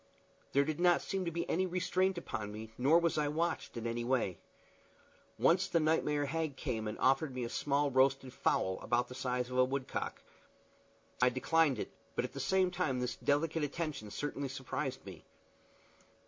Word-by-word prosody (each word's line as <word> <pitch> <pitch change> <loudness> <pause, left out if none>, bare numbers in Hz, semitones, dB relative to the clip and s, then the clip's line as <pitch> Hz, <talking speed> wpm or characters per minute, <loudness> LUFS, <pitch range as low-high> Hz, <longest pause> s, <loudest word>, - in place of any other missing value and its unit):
There 140 - +5
did 155 +1 -2
not 175 -1 +4
seem 190 -1 -2
to 170 - -1
be 170 +1 -3
any 185 +3 +1
restraint 185 +1 +1
upon 110 -10 -4
me, 110 +1 -8
nor 140 +7 +5
was 170 -2 +2
I 150 - +1
watched 160 -3 -2
in 115 - -4
any 115 0 -2
way. 120 -9 0 1.0
Once 170 +11 +4
the 170 - +2
nightmare 150 -2 +2
hag 155 -2 -2
came 115 -7 -2
and 105 - -4
offered 135 +1 +2
me 125 - -2
a 115 - -3
small 145 +2 +1
roasted 135 0 +2
fowl, 95 0 +1
about 120 +1 0
the - - -7
size 125 -1 -2
of 125 - 0
a - - +7
woodcock. 130 +1 -3 1.0
I 125 - +6
declined 140 +2 +2
it, - - -4 0.2
but - - +1
at - - -8
the 140 - -6
same 185 +7 +2
time 135 -7 0
this 125 -1 -2
delicate 155 +2 +1
attention 145 -6 -3
certainly 140 +3 -3
surprised 135 0 -4
me. 95 -5 -10
140 Hz, 180 wpm, -34 LUFS, 125-160 Hz, 1.0 s, a